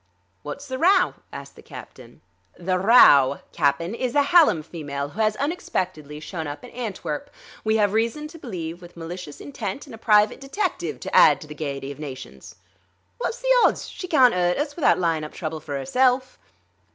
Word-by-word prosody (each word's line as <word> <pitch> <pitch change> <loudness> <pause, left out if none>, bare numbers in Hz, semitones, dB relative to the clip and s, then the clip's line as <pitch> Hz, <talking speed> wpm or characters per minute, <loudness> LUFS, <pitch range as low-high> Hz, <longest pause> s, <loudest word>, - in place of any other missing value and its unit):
"Wot's 280 - -7
the 260 -1 -5
row?" 370 +2 +4 0.2
asked - - -9
the - - -14
captain. - - -13 0.4
"The 185 +1 -1
row, 145 - +6
Cap'n, 165 +4 0
is 245 +1 -3
the 290 - +4
Hallam 285 - +4
female, 145 -4 -5
who 215 - -4
has 215 0 +2
unexpectedly 185 - -3
shown 160 0 -6
up 145 0 -7
in - - -11
Antwerp, 190 -11 -5 0.3
we 220 0 +2
have 205 -2 +2
reason 230 +7 -1
to 330 +1 -12
believe 175 - -6
with 175 0 -14
malicious 165 -2 -8
intent 235 -4 -6
and 275 - -13
a 225 - -10
private 210 +2 +3
detective 275 +10 -3
to - - -4
add - - +7
to - - -9
the 150 - -8
gaiety 140 -2 -5
of 140 - -11
nations." 135 -4 -9 0.6
"Wot's - - -3
the - - +3
odds? - - +2
She 365 - -7
carn't 260 -8 +5
'urt 180 -1 +1
us 290 0 -3
without 325 - +3
lyin' 165 -3 0
up 150 - -8
trouble 160 -2 -5
for 145 -2 -5
'erself." 255 - +1
185 Hz, 185 wpm, -23 LUFS, 155-260 Hz, 0.6 s, add